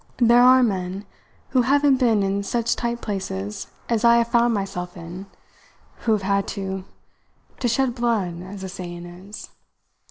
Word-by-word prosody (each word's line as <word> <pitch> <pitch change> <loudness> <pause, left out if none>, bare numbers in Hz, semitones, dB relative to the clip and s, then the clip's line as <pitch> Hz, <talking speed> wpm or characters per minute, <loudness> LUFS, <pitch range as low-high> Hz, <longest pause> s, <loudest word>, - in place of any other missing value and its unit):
There 240 0 +5
are 255 +1 +7
men 190 -2 -2 0.4
who 255 -1 +3
haven't 280 +2 +3
been 230 -6 +3
in 195 +1 0
such 230 +3 0
tight 235 0 -3
places 105 - -4 0.2
as 230 -1 0
I 235 0 +6
have 235 0 +1
found 235 0 +3
myself 190 -4 -3
in 175 +3 -8 0.7
who 225 - +1
have 210 -2 0
had 200 +1 +1
to 190 -1 -4 0.7
to 250 - 0
shed 250 +1 +1
blood, 220 -8 -1
as 190 +2 -9
the 190 - -5
saying 175 -1 -7
is. 185 +4 -10
205 Hz, 160 wpm, -23 LUFS, 185-235 Hz, 0.7 s, are